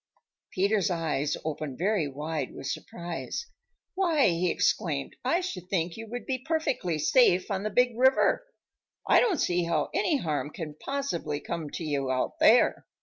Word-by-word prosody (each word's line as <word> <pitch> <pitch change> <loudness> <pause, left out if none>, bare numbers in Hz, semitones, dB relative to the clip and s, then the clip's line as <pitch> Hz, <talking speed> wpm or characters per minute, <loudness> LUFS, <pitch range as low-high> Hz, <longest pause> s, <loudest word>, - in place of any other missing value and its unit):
Peter's 200 0 +1
eyes 155 -5 -1
opened 150 -4 -4
very 190 -3 +1
wide 150 0 -4
with - - -8
surprise. 170 - -5 0.5
"Why," 335 - +3
he 175 +1 +1
exclaimed, 155 -6 0
"I 335 +8 +2
should 185 - -6
think 170 -3 -1
you 225 0 -8
would 245 +2 -5
be 260 -1 -2
perfectly 265 - -1
safe 185 - +3
on 190 -1 -1
the 215 - -2
Big 245 +2 +2
River! 260 - +3 0.6
I - - +6
don't 415 -9 +2
see 175 -1 +1
how 170 - 0
any 340 -3 +2
harm 155 - -2
can 155 0 -7
possibly 170 - -3
come 160 0 -5
to 165 - -6
you 140 -4 -1
out 130 0 -1
there." - - +4
180 Hz, 160 wpm, -28 LUFS, 155-250 Hz, 0.6 s, I